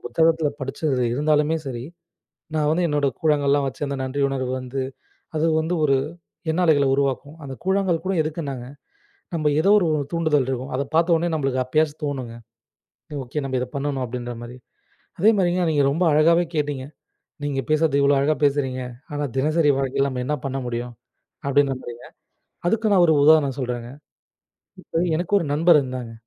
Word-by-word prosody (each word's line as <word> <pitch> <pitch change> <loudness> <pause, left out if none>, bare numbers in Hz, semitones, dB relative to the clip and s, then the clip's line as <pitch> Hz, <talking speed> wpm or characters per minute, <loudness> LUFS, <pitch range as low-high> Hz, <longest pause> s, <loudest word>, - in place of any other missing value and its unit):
புத்தகத்தில் 160 -3 +1
படித்தது. 135 0 -1
இருந்தாலுமே 150 +3 +2
சரி 120 -2 -5 0.7
நான் 150 -1 +1
வந்து 175 +3 +1
என்னோட 145 -2 +1
கூழாங்கல் 150 -3 +2
எல்லாம் 140 0 +3
வைத்தி 135 +2 -4
அந்த 140 0 -3
நன்றி 130 +2 -3
உணர்வு 130 -2 -2
வந்து 130 +1 -4 0.6
அது 160 +2 +2
வந்து 165 +3 -1
ஒரு 140 - +3 0.6
எண்ண 165 +3 0
அலைகளை 145 -4 +4
உருவாக்கும். 140 +2 -1
அந்தக் 135 -2 -8
கூழாங்கல் 190 -3 +1
கூட 190 - 0
எதுக்கு 155 +2 -4
என்றால், 135 -4 -5 0.7
நமக்கு 155 -3 +1
ஏதோ 195 - +2
ஒரு 180 -5 +2 0.2
தூண்டுதல் 155 -5 +1
இருக்கும். 130 +1 -3
அதை 140 - 0
பார்த்த 170 +2 +3
உடனே 170 +1 0
நமக்கு 135 -3 0
அப்பொழுது 155 +4 +1
தோணும்-ங்க. 130 -5 -4 0.9
ஓகே 135 +5 -4
நமக்கு 130 -2 -1
இதை 125 - -2
பண்ணனும் 140 -1 -2
அப்படின்ற 120 0 -5
மாதிரி. 120 +1 -9 0.6
அதே 205 +6 +6
மாதிரிங்க 180 -1 +2
நீங்க 145 -2 +2
ரொம்ப 165 +6 0
அழகாகவே 165 +3 +4
கேட்டீங்க. 145 -3 -2 0.6
நீங்க 145 -2 -1
பேசுகிறது 155 -2 +2
இவ்வளவோ 140 0 +4
அழகாக 150 +2 +1
பேசுகிறீங்க. 135 -2 0 0.3
ஆனா 145 0 -2
தினசரி 155 +2 +2
வாழ்க்கையில் 135 0 0
நமக்கு 125 -1 -3
என்ன 150 - +1
பண்ண 135 0 -2
முடியும் 120 0 -4 0.5
அப்படி 140 +1 +4
என்று 140 - -2
தான் 130 - -4
நம்புகிறீர்கள். 120 -1 -10 0.5
அதற்கு 220 +4 +1
நான் 185 -3 +6
ஒரு 160 - +4
உதாரணம் 145 -3 +5
சொல்கிறேன். 120 -2 -3 1.0
இப்போ - - -5 0.2
எனக்கு 175 +4 -3
ஒரு 170 - -3
நண்பர் 160 +1 +5
இருந்தாங்க. 125 -3 -6
145 Hz, 170 wpm, -23 LUFS, 130-160 Hz, 1.0 s, அதே